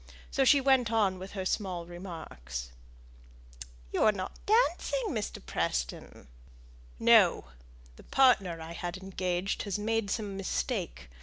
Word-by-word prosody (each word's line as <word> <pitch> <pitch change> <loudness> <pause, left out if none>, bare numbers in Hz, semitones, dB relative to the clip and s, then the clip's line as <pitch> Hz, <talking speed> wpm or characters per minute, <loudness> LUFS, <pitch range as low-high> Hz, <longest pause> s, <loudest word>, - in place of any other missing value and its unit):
So 275 - +2
she 280 +2 +6
went 265 -4 +3
on 200 -5 +2
with 190 +1 -8
her 190 -2 -4
small 185 -4 -2
remarks. 160 - -7 1.2
"You - - 0
are 215 - +6
not 190 -3 -7
dancing, 445 +2 +2
Mr. 215 - -4
Preston!" - - -3 0.7
"No! - - +5 0.5
The - - -14
partner 200 -11 +3
I 160 +1 -8
had 175 +2 -5
engaged 185 0 -2
has 200 -1 -2
made 220 0 -1
some 205 -1 -3
mistake. 65 - -3
195 Hz, 130 wpm, -30 LUFS, 175-225 Hz, 1.2 s, she